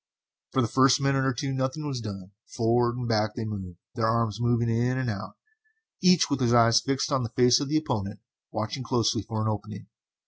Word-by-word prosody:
For 130 - +1
the - - 0
first 130 +4 +4
minute 135 -1 +1
or 135 - +2
two 135 +2 -3
nothing 130 +3 -2
was 135 -4 -3
done. 100 -3 -8 0.2
Forward 120 +1 +1
and 125 -1 -4
back 110 -2 0
they 115 - -4
moved, 95 -5 -6 0.2
their 115 -2 0
arms 115 -1 0
moving 120 0 +1
in 120 +3 0
and 130 -3 -1
out, 100 0 -7 0.7
each 180 -2 +5
with 140 - -1
his 120 -2 +2
eyes 115 -1 +5
fixed 135 +3 -1
on 135 -2 +1
the 115 - -3
face 125 0 +4
of 145 -1 -3
his 155 - +2
opponent, 105 -9 -3 0.3
watching 110 +4 -4
closely 120 -3 0
for 110 +2 -4
an - - -1
opening. 105 -1 -5
120 Hz, 210 wpm, -26 LUFS, 110-130 Hz, 0.7 s, each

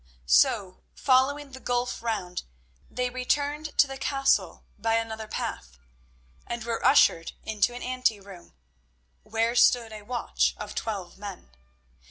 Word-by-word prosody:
So, 70 - +3
following 275 +2 +2
the 260 - -9
gulf 245 -1 -1
round, 205 -6 -3 0.5
they 250 0 -2
returned 290 +4 -1
to - - +7
the 270 -1 -8
castle 270 0 +1
by 225 +2 +1
another 220 -1 -3
path, 65 - -5 0.7
and 235 -1 -4
were 230 0 -3
ushered 165 -11 +4
into 220 +2 0
an 245 - -6
ante 255 -4 0
room, 195 -3 -14 0.7
where 225 +2 0
stood 240 -2 +4
a 215 - -8
watch 240 +3 0
of - - -7
twelve 195 -5 -5
men. 200 - -8
230 Hz, 135 wpm, -27 LUFS, 205-255 Hz, 0.7 s, to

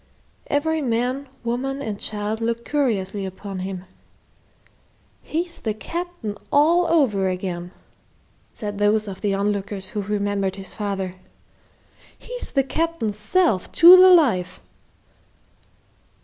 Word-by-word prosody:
Every 320 +2 0
man, 250 +2 -1
woman, 260 +4 -2
and 215 -7 -5
child 215 +1 -3
looked 230 +1 -2
curiously 210 -9 -1
upon 190 0 -6
him. 185 0 -5 1.4
"He's 340 +2 -4
the 215 -2 -2
Captain 335 - -5 0.2
over 295 - +3
again!" 180 -1 -4 0.8
said 205 -2 -6
those 210 +1 +2
of 195 -1 -7
the 200 -2 0
on 200 +1 +1
lookers 195 -1 -3
who 210 - -3
remembered 200 -1 -1
his 195 -1 -3
father. 195 -3 -4 1.0
"He's - - -5
the 275 - +2
Captain's 270 -8 -2
self, 220 - +1
to 345 +3 +10
the 370 0 +8
life!" 215 - +3
215 Hz, 115 wpm, -22 LUFS, 195-285 Hz, 1.4 s, to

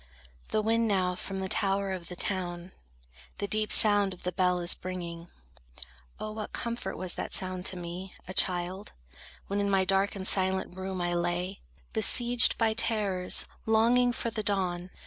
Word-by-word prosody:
The 215 - 0
wind 230 +1 +1
now 185 -3 0
from 190 +1 -5
the 190 - -3
tower 195 0 +1
of 180 -2 -6
the 180 - -8
town 175 -1 -3 0.7
The 200 - -3
deep 215 +1 0
sound 205 -3 +6
of - - -19
the 180 - -2
bell 180 -1 +1
is 175 0 +4
bringing. 175 -2 -7 0.9
Oh, 215 - -5
What 215 0 -7
comfort 235 0 -4
was 185 -1 -1
that - - -5
sound 185 -1 -1
to 185 - -3
me, 175 +2 -8
a 185 - -6
child, 185 +2 0 0.5
When 200 +1 -3
in 200 0 0
my 195 -1 +2
dark 195 +1 +1
and 190 -1 0
silent 190 -1 +3
room 190 -1 -5
I 175 0 -1
lay, 175 +2 -2 0.3
Besieged 240 +2 +5
by 225 -1 +1
terrors, 205 -5 +1 0.2
longing 235 +3 +3
for 235 -1 -4
the 220 - -3
dawn! 185 -3 -2
190 Hz, 170 wpm, -28 LUFS, 180-215 Hz, 0.9 s, sound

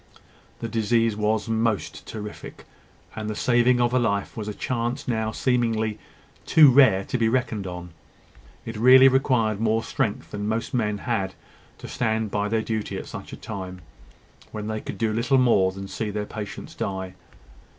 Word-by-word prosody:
The 115 - -2
disease 115 0 +1
was 105 +1 0
most 115 -2 -1
terrific: 105 -1 -8 0.5
and 110 -1 -4
the 105 - -3
saving 120 +1 +3
of 120 0 +2
a 130 - +4
life 100 -4 -1
was 110 -2 -5
a 105 - -3
chance 120 0 -3
now 110 -3 -1
seemingly 110 -4 0 0.5
too 150 -4 +7
rare 125 -8 +5
to 125 - -3
be 115 -1 +3
reckoned 115 -5 -1
on. 90 -1 -7 0.7
It 115 -1 -6
really 130 +3 +8
required 125 -5 +2
more 115 0 +1
strength 105 - -2
than 105 0 -4
most 110 +5 -2
men 105 -4 0
had 100 -5 -2 0.4
to - - -9
stand 110 -3 -1
by 105 0 0
their 110 0 0
duty 110 -2 -3
at - - -6
such - - -9
a - - -8
time, 95 -2 -7 0.7
when 105 -1 -5
they 110 0 -3
could - - -7
do 110 -1 0
little 120 +4 +2
more 115 -7 +4
than 95 +1 -8
see 110 +2 -4
their 105 0 -3
patients 105 -1 -7
die. 95 -1 -4
110 Hz, 170 wpm, -24 LUFS, 105-120 Hz, 0.7 s, really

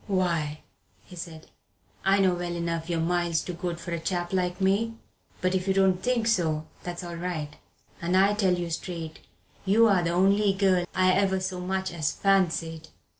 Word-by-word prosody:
"Why," 170 -6 0 0.4
he 180 - -13
said, 165 -2 -8 0.6
"I 195 +1 +4
know 190 -2 +3
well 175 0 -3
enough 170 0 -3
you're 170 -1 0
miles 170 -1 +1
too 180 - -5
good 175 0 -4
for 170 +1 -7
a 170 - -1
chap 175 +1 -2
like 180 -1 0
me 200 +4 +1 0.5
but 185 0 +1
if 185 0 -1
you 190 - +2
don't 190 -1 +3
think 245 -2 +1
so, 160 -8 +1 0.2
that's 175 0 -6
all 170 -1 -6
right. 160 -4 -4 0.5
And 175 +2 +1
I 195 +2 +5
tell 195 -4 +2
you 175 -1 -4
straight, 165 -1 -5 0.4
you're 200 -1 +4
the 170 - 0
only 195 +3 +3
girl 190 -2 +2
I 185 0 +4
ever 190 0 +2
so 185 -1 -3
much 190 0 -2
as 155 -4 0
fancied." 165 -5 +1
180 Hz, 180 wpm, -27 LUFS, 170-190 Hz, 0.6 s, I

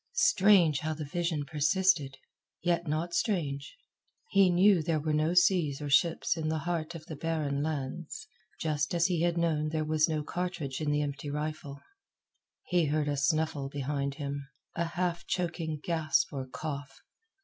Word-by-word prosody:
Strange 190 - +5
how 155 -1 -2
the 155 -1 -5
vision 165 -1 -2
persisted! 150 -1 +2 0.5
Yet 175 -1 +1
not 160 +3 -2
strange. 145 -10 -1 0.5
He 195 -2 +5
knew 180 +1 +5
there 160 0 0
were 155 +1 -1
no 155 +3 +1
seas 175 -6 +3
or 145 -1 -4
ships 165 +4 +3
in 160 -2 -3
the 160 0 0
heart 170 -1 -2
of 160 -2 -9
the 155 - -7
barren 150 -2 -1
lands, 155 +2 -4 0.3
just 150 0 -1
as 170 0 +3
he 175 -3 +1
had 170 0 +1
known 155 -3 +1
there 155 0 -1
was 155 +1 +2
no 155 -1 -1
cartridge 160 -5 -4
in 150 - 0
the 150 0 +1
empty 140 0 -4
rifle. 150 -1 -4 0.8
He 175 -2 +2
heard 150 0 0
a 145 - 0
snuffle 145 0 0
behind 140 0 -2
him 140 -1 -5 0.3
a 170 - 0
half 175 0 -2
choking 165 -3 -2
gasp 165 -1 +1
or 135 -2 -4
cough. 140 0 -6
155 Hz, 165 wpm, -30 LUFS, 145-170 Hz, 0.8 s, Strange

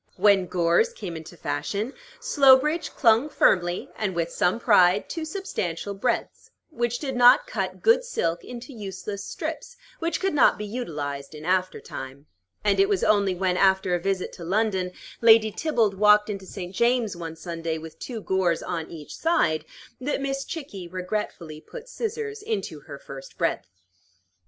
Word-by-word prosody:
When 195 -1 +4
gores 175 - +2
came 180 - -6
into 160 +2 -9
fashion, 200 - -3 0.3
Slowbridge 300 - +4
clung 235 +3 +3
firmly, 175 -10 +2
and 200 -4 -2
with 170 0 -1
some 180 +6 +1
pride, 200 -4 +4
to 325 -2 -4
substantial 205 - -4
breadths, 230 +5 -2 0.2
which 240 -4 -1
did 265 -2 -4
not 245 - +7
cut - - -4
good 470 +2 +5
silk 170 - -2
into 245 +2 -9
useless 200 -1 -6
strips 485 - -6 0.2
which 335 0 -1
could 390 -1 0
not 285 - +5
be 210 - -5
utilized 150 - -5
in 150 +1 -9
after 185 +1 +1
time; 135 +2 -9 0.4
and 205 -1 +2
it 390 +1 +4
was 400 -2 +1
only 200 -3 +3
when, 180 0 0
after 190 -1 +3
a 175 - +2
visit 190 +1 -2
to 170 - -9
London, 190 0 0 0.3
Lady 220 -1 +6
Theobald 230 -8 +1
walked 210 +1 +5
into 195 -2 -7
St. 180 -2 -7
James's 235 -3 +2
one 165 -2 -6
Sunday 165 -1 -4
with 160 0 -10
two 235 -4 -6
gores 185 -4 0
on 165 -3 -4
each 155 -3 -9
side, 325 - +1 0.3
that 280 +3 -2
Miss 275 0 -2
Chickie 210 - -7
regretfully 180 -4 -4
put - - -10
scissors 445 -3 -4
into 420 - -3
her 145 0 -10
first 135 -1 -11
breadth. - - -1
200 Hz, 160 wpm, -25 LUFS, 175-260 Hz, 0.4 s, not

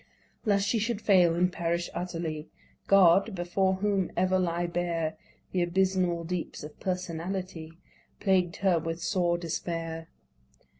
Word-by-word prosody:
Lest 200 -2 +2
she 230 - +2
should 225 0 -1
fail 180 -6 +4
and 180 +1 +2
perish 170 0 -1
utterly, 165 -3 -4 0.4
God, 195 +2 +5
before 190 +2 +1
whom 195 -1 0
ever 185 +1 +3
lie 175 -1 0
bare 170 -2 -1 0.4
The 185 - +1
abysmal 180 -1 +1
deeps 175 -2 -4
of 150 - -10
Personality, 180 -2 -4 0.5
Plagued 185 -4 +2
her 180 -3 +4
with 165 +1 -4
sore 175 0 +1
despair. 165 -1 -4
175 Hz, 130 wpm, -28 LUFS, 170-190 Hz, 0.5 s, God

